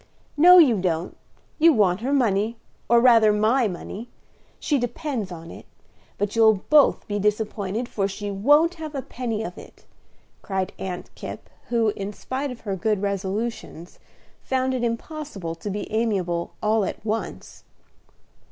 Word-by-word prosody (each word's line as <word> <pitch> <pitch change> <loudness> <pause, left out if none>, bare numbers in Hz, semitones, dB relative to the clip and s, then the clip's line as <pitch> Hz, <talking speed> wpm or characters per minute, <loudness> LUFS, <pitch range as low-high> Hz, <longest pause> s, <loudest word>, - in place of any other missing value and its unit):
"No, 355 +4 +8
you 260 - +6
don't; 175 -2 -2 0.4
you 330 +1 +6
want 200 -4 +2
her 260 +4 -2
money, 225 -4 +1 0.3
or 235 0 +6
rather 230 -3 +6
my 220 +4 +2
money. 205 +5 -7 0.5
She 290 -3 0
depends 245 - -3
on 165 -1 -9
it; - - -12 0.5
but 205 +1 -2
you'll 220 -3 +4
both 300 -2 +5
be 205 0 -2
disappointed, 210 +1 -1
for 195 -5 -1
she 205 +1 -5
won't 290 - +4
have 310 -2 -6
a 270 - -3
penny 230 -4 -4
of 180 -4 -7
it," - - -15 0.6
cried 190 -1 -3
Aunt 180 -2 -6
Kipp, - - -9 0.2
who, 230 -2 +2
in 200 0 -5
spite 265 +6 -4
of 250 -2 -9
her 200 -3 -3
good 210 +1 -1
resolutions, 200 -2 -4 0.4
found 260 0 -1
it 250 -2 -2
impossible 230 - -4
to 165 +5 -7
be 205 +1 -4
amiable 190 -7 -1
all 215 0 +2
at 195 - -5
once. 225 +1 -4
220 Hz, 150 wpm, -24 LUFS, 195-250 Hz, 0.6 s, No